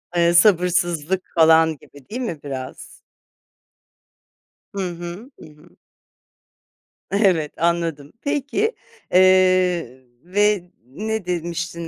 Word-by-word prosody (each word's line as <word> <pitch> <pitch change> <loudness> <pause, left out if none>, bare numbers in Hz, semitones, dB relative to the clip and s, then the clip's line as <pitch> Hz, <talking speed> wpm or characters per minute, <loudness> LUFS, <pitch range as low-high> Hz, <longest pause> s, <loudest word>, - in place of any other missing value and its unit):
Eee, 170 0 +3
sabırsızlık 180 -1 +2
falan 160 -1 +5
gibi, 140 -1 -18
değil 245 +4 -5
mi, 200 - -4
biraz? 130 -2 -7 1.9
Hı 200 - -2
hı. 175 +9 -9
Hı - - -12
hı. 150 +3 -20 1.4
Evet, 185 -7 +2
anladım. 165 -4 -1
Peki, 290 - -1 0.4
eee, 185 -7 +3 0.2
ve 195 0 0
ne 215 - -4
demiştin 170 -1 -4
175 Hz, 90 wpm, -21 LUFS, 160-190 Hz, 1.9 s, falan